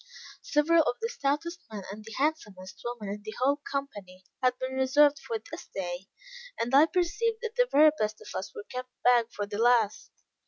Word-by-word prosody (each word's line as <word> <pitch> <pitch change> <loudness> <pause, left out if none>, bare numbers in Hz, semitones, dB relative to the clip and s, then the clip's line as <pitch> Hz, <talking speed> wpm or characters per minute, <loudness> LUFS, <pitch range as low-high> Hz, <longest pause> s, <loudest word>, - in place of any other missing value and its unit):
Several 320 +3 +3
of 270 -5 0
the 455 - -2
stoutest 340 - -2
men 205 -2 -6
and 210 +2 -9
handsomest 210 -11 -2
women 235 -4 -4
in 205 - -8
the 215 +1 -7
whole 275 +3 +3
company, 205 -10 -5 0.2
had 255 -1 +2
been 260 0 -4
reserved 280 +2 +4
for 460 - -3
this 335 -5 -10
day; 180 0 -5 0.5
and 240 +3 -2
I 290 +4 +7
perceived 415 +7 0
that 455 -1 -3
the - - +3
very 305 +1 +7
best 215 0 -1
of - - -10
us - - -4
were 435 - -6
kept 255 0 -6
back 240 -2 +5
for 205 - -3
the 205 +1 -5
last. 230 -3 +3
260 Hz, 190 wpm, -28 LUFS, 215-315 Hz, 0.5 s, I